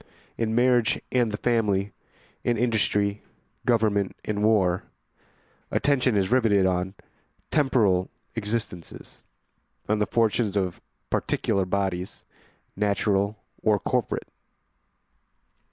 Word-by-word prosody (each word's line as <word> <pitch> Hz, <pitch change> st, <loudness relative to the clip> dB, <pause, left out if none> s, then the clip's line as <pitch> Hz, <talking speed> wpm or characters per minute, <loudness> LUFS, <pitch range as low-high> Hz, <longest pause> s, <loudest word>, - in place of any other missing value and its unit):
In 110 Hz, -1 st, -1 dB
marriage 120 Hz, -2 st, +3 dB
and 120 Hz, -3 st, +2 dB
the 105 Hz, -, -3 dB
family, 105 Hz, -5 st, +1 dB, 0.5 s
in 120 Hz, -1 st, +1 dB
industry, 105 Hz, -3 st, +1 dB, 0.5 s
government, 105 Hz, -4 st, +2 dB
and 105 Hz, -1 st, -2 dB
war, 95 Hz, -5 st, +3 dB, 0.8 s
attention 130 Hz, -5 st, +2 dB
is 95 Hz, +1 st, +1 dB
riveted 110 Hz, -6 st, +4 dB
on 95 Hz, +1 st, 0 dB, 0.6 s
temporal 110 Hz, -11 st, +2 dB, 0.2 s
existences, 105 Hz, -5 st, -5 dB, 0.7 s
on 105 Hz, 0 st, +1 dB
the 105 Hz, -, +1 dB
fortunes 110 Hz, -2 st, +1 dB
of 95 Hz, -3 st, -1 dB, 0.3 s
particular 95 Hz, -1 st, 0 dB
bodies, 95 Hz, -1 st, -2 dB, 0.5 s
natural 100 Hz, 0 st, +1 dB, 0.2 s
or 105 Hz, -1 st, +3 dB
corporate. 125 Hz, -4 st, -1 dB
105 Hz, 95 wpm, -26 LUFS, 100-115 Hz, 0.8 s, riveted